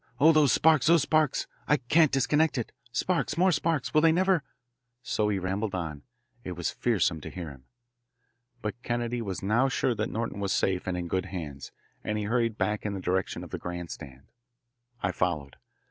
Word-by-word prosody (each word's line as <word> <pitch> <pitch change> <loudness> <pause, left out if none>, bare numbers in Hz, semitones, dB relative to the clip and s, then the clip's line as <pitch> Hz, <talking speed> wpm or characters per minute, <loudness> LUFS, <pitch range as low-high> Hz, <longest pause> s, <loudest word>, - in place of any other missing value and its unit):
Oh, 155 +4 +7
those 155 -4 +5
sparks, 155 -4 +4
those 165 -3 +6
sparks! 155 0 +2 0.2
I 150 - +4
can't 150 +4 +3
disconnect 150 +3 +2
it. 120 - -3 0.2
Sparks, 165 +3 0
more 185 +2 +4
sparks 160 -3 0
will 155 - +5
they 165 0 +6
never 185 0 +3 0.3
" 125 0 -53
So 105 -1 0
he 100 - +1
rambled 95 +2 -2
on. 80 -5 -4 0.4
It 90 - -5
was 85 -1 -2
fearsome 90 -9 +1
to - - -7
hear 85 -5 -6
him. 65 -2 -15 1.0
But 105 +3 -4
Kennedy 120 -1 -2
was 95 -5 -4
now 115 +7 +3
sure 125 -1 +1
that 110 0 -2
Norton 115 -2 -3
was 100 -1 0
safe 95 -1 0
and 90 -1 -1
in 90 -1 -3
good 95 +2 -1
hands, 75 -7 -6 0.3
and 105 - -2
he 105 - -2
hurried 115 0 0
back 105 +2 0
in 105 -1 -2
the - - -4
direction 95 0 -1
of - - -10
the - - -4
grand 90 -1 -5
stand. 65 -1 -10 0.8
I 95 - +1
followed. 80 -7 -2
105 Hz, 195 wpm, -28 LUFS, 90-140 Hz, 1.0 s, Oh